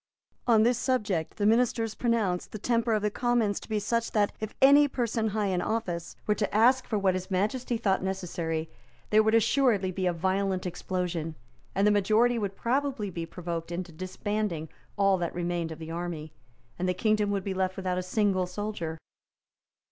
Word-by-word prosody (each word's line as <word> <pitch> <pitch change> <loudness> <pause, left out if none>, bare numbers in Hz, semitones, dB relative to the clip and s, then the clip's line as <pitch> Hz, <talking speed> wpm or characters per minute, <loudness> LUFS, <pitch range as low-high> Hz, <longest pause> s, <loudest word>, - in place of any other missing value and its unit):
On 225 -2 +5
this 240 +1 +2
subject 210 - -1
the 205 - 0
ministers 225 0 +2
pronounced 220 -7 0
the - - -5
temper 230 +1 +1
of 210 -1 +1
the 210 - +1
Commons 240 -4 +1
to - - -14
be 215 - 0
such 230 +3 -1
that, 205 -2 +2
if 215 0 -5
any 285 +2 +7
person 235 -4 -1
high 210 0 0
in 180 - 0
office 180 -7 -3
were 210 - +3
to 210 -1 -2
ask 250 +4 +4
for 215 - 0
what 195 -2 +2
His 185 +1 -4
Majesty 220 +6 0
thought 195 -4 +1
necessary, 170 -4 -2 0.4
there 215 +1 +6
would 220 +1 +3
assuredly 230 -4 +3
be 185 0 -1
a - - +3
violent 190 +2 0
explosion; 175 -2 -3 0.4
the 200 +2 +4
majority 220 +4 +3
would 200 -2 -3
probably 250 -3 -1
be 165 -1 -5
provoked 170 -1 -5
into 175 0 -4
disbanding 185 -1 -3 0.3
all 195 -2 +3
that 170 -1 -3
remained 175 -1 -2
of 160 - -6
the 160 0 -7
army; 165 -2 -5 0.5
and 185 +1 0
the 180 - 0
kingdom 215 +1 +2
would 200 -2 -1
be 195 - -2
left 190 0 -1
without 185 -1 -1
a - - -1
single 185 -1 +1
soldier. 180 -4 -4
200 Hz, 185 wpm, -28 LUFS, 180-225 Hz, 0.5 s, any